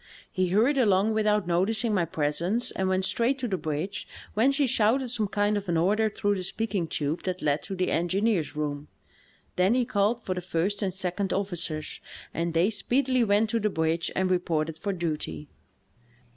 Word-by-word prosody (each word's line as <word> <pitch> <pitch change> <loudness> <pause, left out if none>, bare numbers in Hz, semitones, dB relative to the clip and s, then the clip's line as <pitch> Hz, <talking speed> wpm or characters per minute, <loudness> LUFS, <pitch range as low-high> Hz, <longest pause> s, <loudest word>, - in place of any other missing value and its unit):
He 185 -3 0
hurried 230 +10 +3
along 210 -2 +3
without 210 -2 +2
noticing 210 +6 +1
my 185 -4 +2
presence 165 +9 0
and 190 0 -1
went 185 0 +1
straight 240 +7 +1
to 255 -2 -3
the 195 - -1
bridge, 160 +3 -4 0.3
whence 265 +6 +3
he 290 - +3
shouted 245 +1 +2
some 220 -3 -1
kind 205 +1 +1
of 200 -2 -5
an 170 - +2
order 210 +6 +2
through 205 0 0
the 185 - -4
speaking 200 -3 -2
tube 150 +1 -2
that 185 0 -4
led 145 0 +1
to 195 - -6
the 185 0 0
engineer's 185 -1 0
room. 145 -1 -3 0.7
Then 185 +6 +3
he 250 -1 +2
called 220 +3 +1
for 185 - -1
the 180 - -4
first 185 +4 -1
and 195 -2 0
second 190 +1 -2
officers, 175 -6 -2 0.3
and 170 0 -2
they 175 +6 +3
speedily 255 +4 +1
went 210 0 +2
to 230 - +1
the 210 0 +1
bridge 160 -1 0
and 190 0 +1
reported 165 -3 0
for 200 - -2
duty. 150 - -3
190 Hz, 185 wpm, -27 LUFS, 170-215 Hz, 0.7 s, hurried